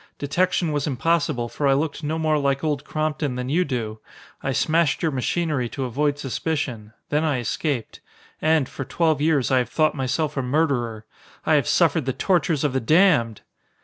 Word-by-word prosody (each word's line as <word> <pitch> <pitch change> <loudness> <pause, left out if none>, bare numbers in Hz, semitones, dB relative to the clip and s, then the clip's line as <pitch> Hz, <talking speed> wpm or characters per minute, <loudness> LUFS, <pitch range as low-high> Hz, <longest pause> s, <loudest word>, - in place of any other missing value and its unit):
Detection 170 +3 0
was 145 -1 -1
impossible, 145 -2 0
for 140 +4 -2
I 135 - +4
looked 150 +1 -2
no 155 +2 -1
more 155 -1 +1
like 140 0 0
Old 150 -3 -1
Crompton 155 -3 -2
than 125 0 -4
you 170 +6 +2
do. 115 -7 -4 0.4
I 135 - -1
smashed 160 +4 +1
your 160 - +2
machinery 140 -1 -1
to 135 - -4
avoid 145 +4 0
suspicion. 135 -6 -3 0.2
Then 150 +2 +1
I 150 -4 +1
escaped. 125 +1 -3 0.4
And, 155 -4 +3
for 135 - -6
twelve 155 +2 0
years, 145 -6 +2
I 130 - +4
have 125 -3 -2
thought 155 +2 +2
myself 135 +3 -1
a 135 - 0
murderer. 125 -5 0 0.4
I - - +3
have 145 -2 +3
suffered 150 -2 +2
the 130 - +1
tortures 165 0 +1
of 145 -3 +1
the 130 - +1
damned!" 150 - +3
145 Hz, 180 wpm, -23 LUFS, 130-155 Hz, 0.4 s, I